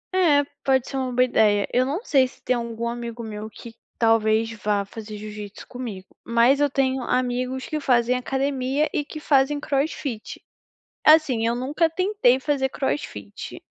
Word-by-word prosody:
É, 300 -6 +4 0.2
pode 265 -2 +2
ser - - -6
uma 260 -1 -2
boa 250 +1 +3
ideia. 210 -4 +3
Eu 255 +1 +3
não 340 - -3
sei 265 -4 +4
se - - -19
tem 255 - +1
algum 235 0 -3
amigo 235 0 -5
meu 215 0 -6
que 230 +1 -12 0.2
talvez 225 0 +2
vá 205 -1 +1
fazer 215 +1 -8
jiu-jitsu 210 -1 -9
comigo, 225 -7 -7 0.2
mas 235 +4 +3
eu 290 - +3
tenho 265 -1 0
amigos 255 +1 -1
que 310 - -2
fazem 250 -3 +2
academia 270 +2 0
e 295 - 0
que 310 +1 -9
fazem 290 -1 +2
crossfit. 275 -5 -3 0.7
Assim, 305 -7 +5
eu 235 +1 +1
nunca 300 +6 +1
tentei 370 -8 +2
fazer 265 -1 0
crossfit 105 - -5
250 Hz, 160 wpm, -23 LUFS, 225-275 Hz, 0.7 s, Assim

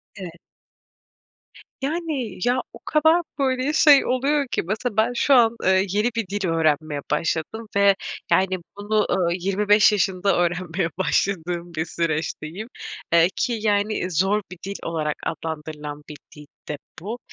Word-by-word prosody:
Evet. 175 -4 -9 1.4
Yani. 295 - -3
Ya, 250 +1 +2
o - - -11
kadar, 320 +3 +4 0.2
böyle, 265 +2 +1
şey 295 -3 +6
oluyor 275 +3 +1
ki - - 0
mesela 215 +4 -3
ben 225 +3 +3
şu 275 - +3
an, 235 -3 +5
eee, 190 +1 +3
yeni 210 +5 +1
bir 225 -4 -2
dil 200 0 -2
öğrenmeye 155 -2 +1
başladım 165 +8 -2
ve 200 -1 +5 0.4
yani, 190 0 +3 0.2
bunu, 210 +1 +1
ııı, 180 -3 +2
25 200 +4 +3
yaşında 195 -1 +1
öğrenmeye 175 0 0
başladığım 175 -2 -1
bir 160 0 -2
süreçteyim. 165 +4 -3 0.5
Eee, 170 0 +6
ki 240 -2 0
yani, 205 -3 0
zor 190 +6 +2
bir 185 - -8
dil 200 +1 -5
olarak 155 -2 -2
adlandırılan 150 -2 -5
bir 150 - -8 0.2
dil 150 0 -12 0.2
de 150 - -3 0.2
bu. 220 +7 -5
195 Hz, 140 wpm, -23 LUFS, 165-225 Hz, 1.4 s, şey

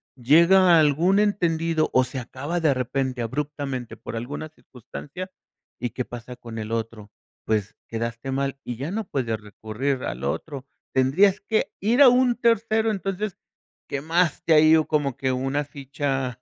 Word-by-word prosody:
llega 170 +8 +5
a 165 - +7
algún 160 +6 +3
entendido 165 -6 +1
o 130 - +5
se 130 +1 -5
acaba 135 +7 -4
de 155 -4 +3
repente 130 0 -2
abruptamente 135 0 -4
por - - -8
alguna 140 +7 -5
circunstancia, 150 - -9 0.5
¿y 120 - -2
qué 125 +1 -4
pasa 120 +1 -9
con 115 -2 -9
el 110 0 -5
otro?, 115 -2 -4 0.3
pues 105 -2 -1
quedaste 115 +3 -4
mal, 135 0 -1
y 120 - -5
ya 140 +6 -4
no 220 +3 -2
puedes 120 -9 -2
recurrir 110 +6 -3
al - - -4
otro, 140 -4 -4 0.3
tendrías 180 +10 +3
que 215 +2 0
ir 230 +7 +3
a 280 - +10
un 250 0 +3
tercero. 225 -1 +2
Entonces, 195 0 -3 0.5
quemaste 165 +3 +1
ahí 155 +1 +7
o 155 - +2
como 145 -4 0
que 130 0 -1
una 135 +3 -1
ficha 135 -3 -3
140 Hz, 155 wpm, -24 LUFS, 125-170 Hz, 0.5 s, a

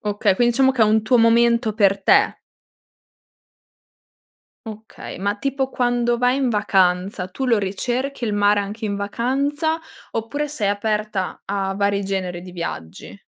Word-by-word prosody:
Okay, 205 -1 +1
quin 240 +4 +2
diciamo 265 +2 +3
che 245 - +2
è - - +7
un 215 +1 +3
tuo 235 +3 +3
momento 230 0 +3
per 200 -2 +2
te. - - +3 2.3
Okay. 220 -3 -9
Ma, 200 +2 -1
tipo, 270 +2 -2
quando 240 -1 0
vai 250 +2 +2
in 265 -3 0
vacanza, 190 -3 +1
tu 265 +8 -4
lo 235 -3 +3
ricerchi 240 +7 -3
il 210 -2 -1
mare 205 0 +3
anche 210 +3 -6
in 200 -1 -2
vacanza, 280 +10 -1 0.3
oppure 255 +7 -3
sei 225 -9 -2
aperta 210 -2 -2
a 195 -1 -2
vari 200 0 0
generi 185 -3 -3
di 185 - -10
viaggi? 170 - -7
215 Hz, 150 wpm, -21 LUFS, 200-245 Hz, 2.3 s, è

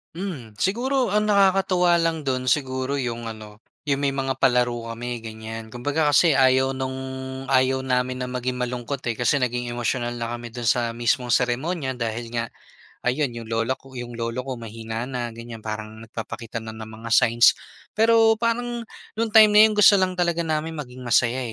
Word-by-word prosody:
Hmm, 165 - -6
siguro 250 +6 +1
ang 210 +2 +1
nakakatuwa 190 -3 +4
lang 165 -3 0
dun 130 -1 0
siguro 130 +1 0
yung 120 -2 -3
ano, 110 0 -12 0.2
yung 140 0 0
may 140 - +2
mga 135 -1 -2
palaro 120 -2 +2
kami 120 0 -5
ganyan. 110 0 -8
Kumbaga 145 +5 0
kasi 155 +1 +5
ayaw 130 0 +3
nung 130 0 -4 0.5
ayaw 130 0 +3
namin 130 -1 -1
na 125 - -3
maging 125 0 -3
malungkot 125 +2 -3
eh, 115 - 0
kasi 120 +5 +1
naging 120 -1 -2
emosyonal 120 0 -1
na 115 - -2
kami 120 -1 -8
dun 120 0 -5
sa 120 0 +2
mismong 120 +1 0
seremonya 130 - 0
dahil 115 -1 -3
nga 115 0 -3 0.6
ayun 125 -1 0
yung 115 - -8
lola 115 +3 -1
ko, 135 -1 -17
yung 120 -1 -7
lolo 115 +2 -2
ko 130 -1 -5
mahina 115 +1 -6
na 125 -2 -4
ganyan. 115 -1 -10
Parang 110 0 -6
nagpapakita 115 0 -6
na 110 -1 -8
ng 110 0 -9 0.2
mga - - -5
signs. 115 +1 +5 0.4
Pero 225 0 +5
parang 235 +1 -1 0.3
nung 225 0 -1
time 215 -1 +7
na 210 - +8
yun 215 -1 +4
gusto 210 0 +8
lang 185 -2 +1
talaga 170 -1 +1
namin 160 0 -2
maging 130 -4 -8
masaya 120 +1 +3
125 Hz, 180 wpm, -23 LUFS, 115-155 Hz, 0.6 s, na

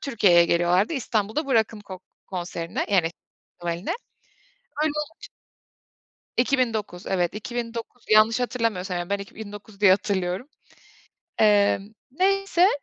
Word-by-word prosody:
Türkiye'ye 200 -10 +4
geliyorlardı, 175 - +2
İstanbul'da 225 +1 -1
bu 265 - +1
Rock'n 220 -1 +1
Coke 185 -1 -9 0.2
konserine, 175 -2 -4
yani 170 -4 +3 0.5
festivaline. 175 +2 -3 0.9
Öyle 310 - +2
olunca 300 +2 -6 1.1
2009, 230 -8 0
evet, 180 0 0
2009. 235 +1 -5
Yanlış 215 +2 +5
hatırlamıyorsam, 225 -7 -1
yani, 175 +2 -4
ben 200 - +1
2009 205 0 -10
diye 195 -2 +7
hatırlıyorum. 190 +3 0 0.9
Emm, 205 0 +3 0.2
neyse. 385 +3 +3
210 Hz, 110 wpm, -25 LUFS, 185-240 Hz, 1.1 s, diye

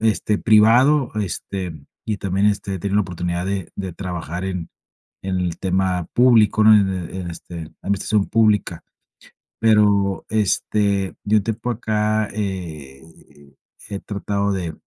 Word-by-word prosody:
este, 110 -1 +1
privado, 120 +6 +4
este, 95 -2 -4 0.3
y 110 - -1
también, 100 +1 0
este, 100 -1 0
he - - -4
tenido 100 +2 -1
la 105 - +4
oportunidad 90 -1 -3
de 95 -3 -3
de 95 -3 -4
trabajar, 90 -1 -5
en 90 -3 -4 0.5
en 95 -1 -2
el 90 -2 -2
tema 95 -2 0
público, 115 -4 +5
¿no? 110 - +8
En 100 -2 +4 0.3
en 90 -2 -5
este, 85 +1 -10
en 80 - -5
la 80 - -15 0.2
administración 100 +1 +1
pública. 105 -6 +2 0.8
Pero, 105 -3 +3
este, 100 -2 0
de 105 +1 +2
un 100 - +1
tiempo 115 +2 -3
a - - 0
acá, 110 -1 0
he 85 -10 -5 0.9
he 100 -1 -4
tratado 100 0 -2
de, 90 -4 -3
100 Hz, 150 wpm, -21 LUFS, 90-105 Hz, 0.9 s, no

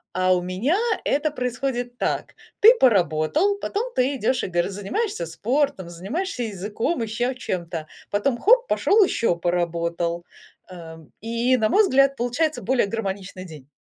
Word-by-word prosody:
А 185 0 +2
у 180 - +1
меня 190 - 0 0.3
это 295 +2 +1
происходит 250 -2 -3
так: - - -2 0.3
ты 450 +4 +9
поработал, 220 - +3
потом 465 +6 -3
ты 265 +2 +1
идешь 255 +1 0
и - - -1
гов 175 -1 0
занимаешься 200 - -3
спортом, 220 - -1
занимаешься 250 - -4
языком, 215 - -3
ещё 240 +4 -2
чем-то, 170 -9 -4 0.2
потом, 235 +5 0
хоп, 485 - +4
пошел 425 +1 +3
еще 230 - 0
поработал. 170 0 -1 0.4
Ам, 160 -3 -11
и 235 +3 +1
на 215 -2 +1
мой 420 - +5
взгляд 275 -6 +3
получается 270 +7 -1
более 260 -4 +1
гармоничный 195 -3 -5
день. 155 -7 -12
225 Hz, 145 wpm, -23 LUFS, 180-275 Hz, 0.4 s, ты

